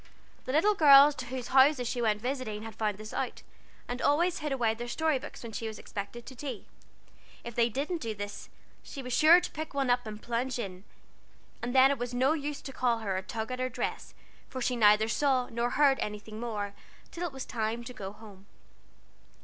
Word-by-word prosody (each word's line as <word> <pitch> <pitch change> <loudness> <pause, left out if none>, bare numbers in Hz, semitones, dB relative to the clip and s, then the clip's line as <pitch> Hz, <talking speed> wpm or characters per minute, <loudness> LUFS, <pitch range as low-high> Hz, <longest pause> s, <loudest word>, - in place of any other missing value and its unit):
The 255 - -2
little 330 +9 +4
girls 290 -4 +8
to 255 -3 -7
whose 255 -1 -5
houses 265 -1 +5
she 245 0 -2
went 215 -1 +1
visiting 245 -5 -3
had 225 0 -7
found 210 -2 -2
this 215 +1 -9
out, - - -3 0.4
and 245 +1 -4
always 340 +5 +2
hid 300 -1 -3
away 235 -5 +1
their 240 +2 -6
story 310 +3 +1
books 295 -1 -10
when 230 - -7
she 225 +1 -4
was 220 - -6
expected 210 +4 -7
to 265 - -10
tea. 255 -4 -6 0.8
If 235 - -7
they 235 +1 +2
didn't 300 - -3
do 225 -4 -3
this, 205 0 -7 0.3
she 275 - -8
was 250 -1 -4
sure 315 +7 +7
to - - -6
pick 315 -2 -6
one 270 -3 +2
up 245 -1 +1
and 210 -1 -7
plunge 240 +3 -2
in, 195 -4 -6 0.8
and 245 +2 -3
then 265 +1 +7
it 280 - -2
was 245 0 -4
no 260 +4 +3
use 295 -2 -4
to 270 - -7
call 245 -2 +1
her, 205 -4 -2
or 185 - -1
tug 220 +5 -5
at 255 - -4
her 255 0 0
dress, 255 - -4 0.3
for 260 - -5
she 250 0 0
neither 215 -1 +5
saw 255 +1 +1
nor 235 +1 -1
heard 275 0 +3
anything 210 +1 -5
more, 210 -4 -3 0.4
till 345 - -5
it - - -8
was 265 -1 -7
time 225 +1 -2
to 250 - -8
go 195 -4 -6
home. 205 -2 -14
245 Hz, 215 wpm, -30 LUFS, 220-275 Hz, 0.8 s, girls